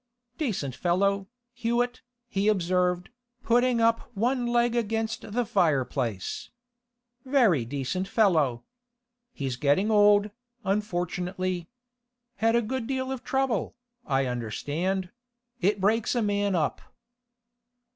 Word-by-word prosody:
'Decent 195 - -2
fellow, 195 +6 +1 0.3
Hewett,' 245 0 -1 0.3
he 200 -3 0
observed, 180 -1 +1 0.3
putting 245 0 +3
up 230 0 +2
one 245 +3 +1
leg 240 0 +2
against 225 -1 -2
the 245 +1 +1
fireplace. 135 - 0 0.7
'Very 235 - +3
decent 145 +9 -3
fellow. 155 - +2 0.7
He's 135 - -4
getting 150 - +2
old, 205 0 +5 0.3
unfortunately. 185 -2 -2 0.7
Had 225 +2 +2
a 235 - +3
good 235 +1 -3
deal 260 -1 -2
of 265 -2 -5
trouble, 265 -6 0 0.3
I 135 - +1
understand; 145 - -2 0.5
it 205 0 +2
breaks 220 +5 +2
a 240 - +1
man 205 -1 +1
up. 155 -3 0
200 Hz, 105 wpm, -27 LUFS, 175-230 Hz, 0.7 s, old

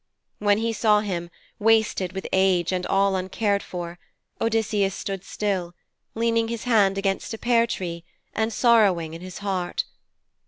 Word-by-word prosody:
When 205 -1 +3
he 225 +1 -1
saw 210 -1 +3
him, 175 -5 -3 0.3
wasted 220 -4 +2
with 190 - -5
age 190 -2 +3
and 180 -1 -1
all 195 0 +2
uncared 200 +2 0
for, 175 -1 -7 0.4
Odysseus 215 -3 +1
stood 195 -2 -5
still, 185 -4 -2 0.4
leaning 230 0 +1
his 230 -1 -4
hand 205 -5 +3
against 195 +2 -1
a - - -9
pear 235 0 +3
tree 170 -6 -4 0.3
and 220 +1 0
sorrowing 205 -10 +3
in 165 - -8
his 185 0 -8
heart. 185 -3 -1
195 Hz, 150 wpm, -24 LUFS, 185-225 Hz, 0.4 s, When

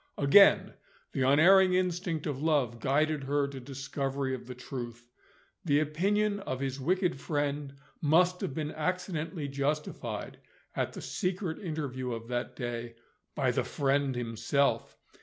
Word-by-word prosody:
Again, 150 +8 +6 0.4
the - - -2
unerring 180 +8 +6
instinct 180 -3 -1
of 145 -3 -3
love 140 -7 +1
guided 150 +4 +1
her 145 +1 +1
to 140 -1 -7
discovery 135 +1 -3
of 125 -1 -6
the 125 - -7
truth. 120 -2 -7 0.6
The 145 -5 +3
opinion 200 +7 +1
of 130 -10 -4
his 135 0 -3
wicked 180 +2 +1
friend 145 -1 -2 0.3
must 180 +4 +3
have 135 - -3
been 155 -1 -2
accidentally 165 -2 -3
justified, 140 +2 -3 0.4
at - - -1
the - - -8
secret 180 -3 -2
interview 140 - -3
of 115 0 -7
that 120 -1 -3
day, 120 -2 -5 0.4
by - - +2
the - - 0
friend 140 -1 0
himself! 120 +4 0
145 Hz, 140 wpm, -30 LUFS, 130-165 Hz, 0.6 s, Again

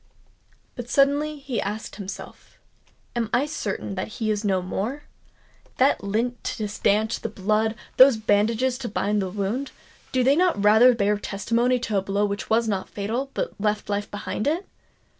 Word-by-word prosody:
But 245 -1 -7
suddenly 290 +3 +2
he 270 -5 -3
asked 210 +3 -5
himself—"Am 215 +3 -8
I 255 +4 +2
certain 205 -9 -4
that 185 -1 -3
he 220 -3 0
is 210 0 -1
no 195 -3 +2
more? 225 +10 -3 0.7
That 265 -3 +3
lint 230 +5 -1
to 215 -3 -2
stanch 210 +2 +1
the 225 - -3
blood—those 220 +5 +3
bandages 225 +4 +1
to 245 - -4
bind 205 0 0
the 190 - -2
wound,—do 235 +5 -4
they 270 +3 +4
not 345 - +2
rather 220 +4 +7
bear 205 -1 +1
testimony 230 +6 0
to 215 -4 -1
a - - -3
blow 200 +2 0
which 200 0 -4
was 225 +1 +2
not 195 -3 -2
fatal, 230 +7 -3
but - - -2
left 210 0 -1
life 205 0 -2
behind 205 +2 -4
it? 335 +6 0
220 Hz, 160 wpm, -24 LUFS, 205-255 Hz, 0.7 s, rather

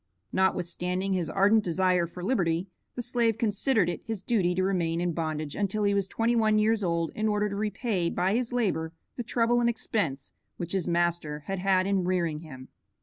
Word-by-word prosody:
Notwithstanding 185 0 0
his 180 -3 -1
ardent 205 +2 +4
desire 180 0 +2
for 175 +1 -9
liberty, 180 -5 +1 0.3
the 245 - -3
slave 235 -2 +1
considered 220 -2 +2
it 175 - -3
his 225 -4 -5
duty 185 -7 +1
to 185 - +1
remain 170 -4 0
in 175 -1 0
bondage 155 -2 -3
until 210 +1 -1
he 200 0 +3
was 200 -1 +1
twenty 230 +4 0
one 215 -2 +3
years 215 0 +2
old 170 -2 0
in 215 0 -1
order 210 0 +1
to 200 - -4
repay 210 -3 -1
by 185 +3 0
his 240 +1 0
labor 180 -10 0 0.2
the - - -3
trouble 240 +1 +2
and 235 - +3
expense 200 - -2 0.3
which 175 0 -5
his 190 -3 0
master 170 -3 0
had 195 +5 -4
had 185 0 +2
in 195 -1 +1
rearing 175 -4 0
him. 130 -5 -11
190 Hz, 195 wpm, -28 LUFS, 170-215 Hz, 0.3 s, ardent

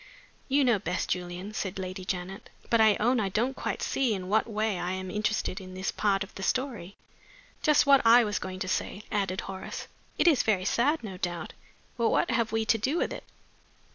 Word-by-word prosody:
'" - - -33
"You 285 - +5
know 235 -5 +3
best, 175 0 -2
Julian," 180 +3 -4
said 195 -3 -3
Lady 185 0 -5
Janet. 185 +1 -5 0.2
"But 230 -1 +5
I 215 -2 +6
own 245 +3 +2
I 200 -3 0
don't 240 +7 0
quite - - -3
see 250 -6 +1
in 185 -1 -6
what 220 +2 +2
way 215 -3 -1
I 175 +1 -2
am 185 0 -5
interested 210 -1 -1
in 185 0 -10
this 190 +1 -2
part 200 -1 +1
of 195 - -12
the - - -8
story." 230 -5 -2 0.7
"Just 300 -1 +4
what 275 -1 +6
I 235 +1 +7
was 210 -2 -1
going 185 0 -6
to - - -2
say," 195 +2 -2
added 195 -3 -1
Horace. 190 -1 -6 0.3
"It - - +3
is 300 -8 +5
very 195 -4 +1
sad, 285 +9 +1
no 195 -4 -6
doubt. 175 -3 -4 0.4
But 235 -1 +2
what 345 - +1
have 230 -3 +1
we 225 0 0
to 220 +1 +2
do 270 +10 0
with - - 0
it?" - - -8
205 Hz, 215 wpm, -28 LUFS, 185-230 Hz, 0.7 s, I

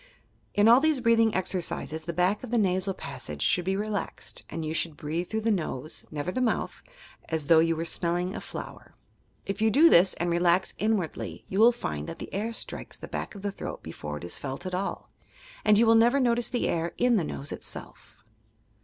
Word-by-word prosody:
In 205 +1 +5
all 235 +2 +8
these 310 -1 +2
breathing 230 -2 +3
exercises, 170 -4 -2
the 170 - -2
back 180 +6 +1
of 250 - -6
the 240 - +1
nasal 190 -2 +1
passage 75 -1 -5
should 180 - +2
be 190 +1 +1
relaxed, 210 0 -4
and 165 -1 -4
you 155 - -2
should 160 -2 -1
breathe 160 +5 -3
through 220 0 -1
the 225 +1 +1
nose 155 -6 -3
(never 155 +3 -3
the 255 - -2
mouth) 240 -3 -1 0.5
as 160 -3 -1
though 160 +2 +6
you 165 0 +3
were 165 +1 -3
smelling 175 +2 -1
a - - -5
flower. - - -9 0.5
If 195 - -4
you 220 - +4
do 310 +9 +6
this 180 +2 +6
and 175 0 -1
relax 175 +2 +2
inwardly, 210 -6 -2
you 190 - -1
will 230 +2 +8
find 75 - -4
that - - -7
the - - -8
air 215 +4 -2
strikes 230 - -5
the - - -9
back - - -5
of 200 - -10
the 200 - -1
throat - - -7
before 75 0 -6
it - - -10
is 85 - -3
felt 135 +6 -5
at 185 - -4
all, 190 +2 -3 0.5
and 210 - +5
you 230 - +5
will 225 - +6
never 235 +4 +5
notice 240 -2 +2
the 245 -1 0
air 170 0 -1
in 245 -1 +3
the 180 - +1
nose 140 -1 -6
itself. 110 - -8
185 Hz, 215 wpm, -27 LUFS, 165-225 Hz, 0.5 s, all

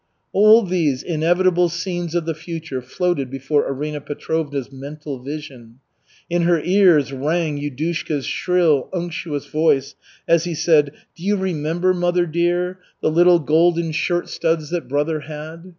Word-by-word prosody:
All 215 +3 +6
these 165 -8 0
inevitable 175 +2 +2
scenes 175 0 -4
of 170 -2 0
the 165 - -1
future 160 -4 -6
floated 140 +1 -1
before 135 +3 0
Arina 150 +2 -4
Petrovna's 145 -2 -3
mental 140 +1 -7
vision. 135 -5 -8 0.5
In 175 0 0
her 170 -1 +3
ears 175 -6 +4
rang 150 +2 -1
Yudushka's 145 0 -3
shrill, 170 -7 +1
unctuous 170 -4 -4
voice 150 -3 +1 0.3
as 165 0 +3
he 170 -2 -3
said: 150 -3 +3 0.2
"Do - - -17
you 205 +2 +1
remember, 175 0 0
mother 175 0 +1
dear, 175 +2 0 0.2
the - - +2
little 175 +2 +6
golden 165 +1 +2
shirt 175 +2 -1
studs 160 -2 -1
that 175 -1 -3
brother 150 +3 0
had? 155 +4 -9
160 Hz, 140 wpm, -20 LUFS, 145-175 Hz, 0.5 s, All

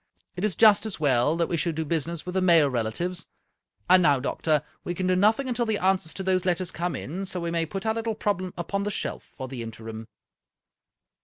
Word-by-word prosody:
It 180 - -5
is 210 -6 0
just 220 +1 +6
as 205 - -4
well 145 +1 +2
that 170 - +2
we 170 - -1
should 165 0 -1
do 160 0 -2
business 165 +1 -2
with 180 - -5
the 190 - +1
male 170 -5 +5
relatives. 130 +10 -1 0.6
And 185 - +7
now, 145 -6 +4
doctor, 150 +3 0 0.2
we 175 - -4
can 185 - -2
do 185 0 +2
nothing 220 +8 +3
until 240 -2 -1
the 220 -1 +1
answers 185 -4 +1
to 190 - -4
those 185 -1 +1
letters 180 -1 0
come, 175 +1 -4
so 185 -1 -2
we 170 -1 -3
may 165 -1 0
put 195 +4 -5
our 220 - +2
little 225 -1 -2
problem 185 -4 -2
upon 185 +4 -2
the 205 - -1
shelf - - -4
for 130 -1 -5
the 125 -2 -6
interim." 115 0 -8
175 Hz, 220 wpm, -26 LUFS, 155-195 Hz, 0.6 s, And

